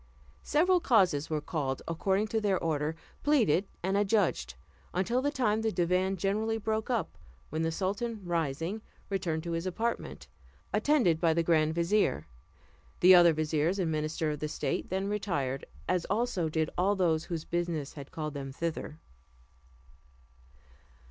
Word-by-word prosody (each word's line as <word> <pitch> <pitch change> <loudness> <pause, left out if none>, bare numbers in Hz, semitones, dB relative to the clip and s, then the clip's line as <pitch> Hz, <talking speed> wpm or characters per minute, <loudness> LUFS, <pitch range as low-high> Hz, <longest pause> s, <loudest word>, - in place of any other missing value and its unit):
Several 360 +4 +3
causes 185 - +3
were 155 -1 -1
called, 140 -4 -3
according 190 +5 +1
to 220 0 0
their 200 -3 +2
order, 155 -1 -1 0.3
pleaded 225 - +3 0.2
and 190 +2 0
adjudged, 195 - +1 0.4
until 235 +8 +1
the 285 - +1
time 220 -7 +1
the 220 0 0
divan 185 +1 +1
generally 215 +4 0
broke 220 +1 -2
up, 230 -9 -2 0.3
when 155 +2 -1
the 165 0 0
sultan, 205 +6 -2
rising, 165 +3 -2 0.3
returned 170 -5 -1
to 170 - -4
his 165 +2 -2
apartment, 230 +6 -3 0.5
attended 240 - +3
by 165 -2 +3
the 170 - +2
grand 160 -1 +2
vizier; 170 - +1 0.7
the 185 +1 +8
other 175 -1 +8
viziers 155 +3 0
and 175 -4 0
ministers 155 -1 -2
of 150 - -2
state 140 -2 -2
then 190 +1 -1
retired, 145 -11 -2 0.2
as 180 -2 +1
also 210 -6 0
did 160 0 -1
all 195 +3 +3
those 165 -4 +1
whose 165 -3 -4
business 170 -4 -2
had 140 -2 -9
called 155 -2 -4
them 135 -2 -5
thither. 155 +1 -4
175 Hz, 150 wpm, -30 LUFS, 155-205 Hz, 0.7 s, the